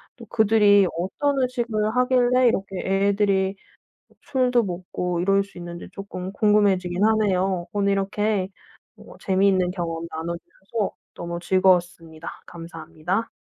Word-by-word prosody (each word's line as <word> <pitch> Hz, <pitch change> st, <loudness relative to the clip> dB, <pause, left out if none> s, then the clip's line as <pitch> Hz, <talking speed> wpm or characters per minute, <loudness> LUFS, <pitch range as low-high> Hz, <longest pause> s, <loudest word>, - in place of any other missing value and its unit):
또 235 Hz, -, -12 dB
그들이 205 Hz, -3 st, +4 dB
어떤 270 Hz, -, -1 dB
의식을 235 Hz, -4 st, -1 dB
하길래 250 Hz, 0 st, +3 dB
이렇게 195 Hz, -4 st, -1 dB
애들이 195 Hz, 0 st, +1 dB, 0.6 s
어 -, -, -25 dB
술도 250 Hz, -3 st, +1 dB
먹고 180 Hz, -1 st, -3 dB
이럴 195 Hz, +2 st, +3 dB
수 200 Hz, -, -20 dB
있는지 175 Hz, 0 st, -8 dB
쪼끔 190 Hz, -2 st, -6 dB
궁금해지긴 200 Hz, -3 st, +2 dB
하네요. 190 Hz, -5 st, +1 dB
오늘 200 Hz, -1 st, +1 dB
이렇게 195 Hz, 0 st, 0 dB, 0.5 s
어 -, -, -14 dB
재미있는 190 Hz, -1 st, +2 dB
경험 170 Hz, -2 st, -4 dB
나눠 165 Hz, +2 st, -4 dB
주셔서 195 Hz, +5 st, -5 dB, 0.2 s
너무 170 Hz, 0 st, -5 dB
즐거웠습니다. 175 Hz, -3 st, +1 dB, 0.2 s
감사합니다. 170 Hz, +4 st, -5 dB
195 Hz, 310 characters per minute, -23 LUFS, 180-215 Hz, 0.6 s, 그들이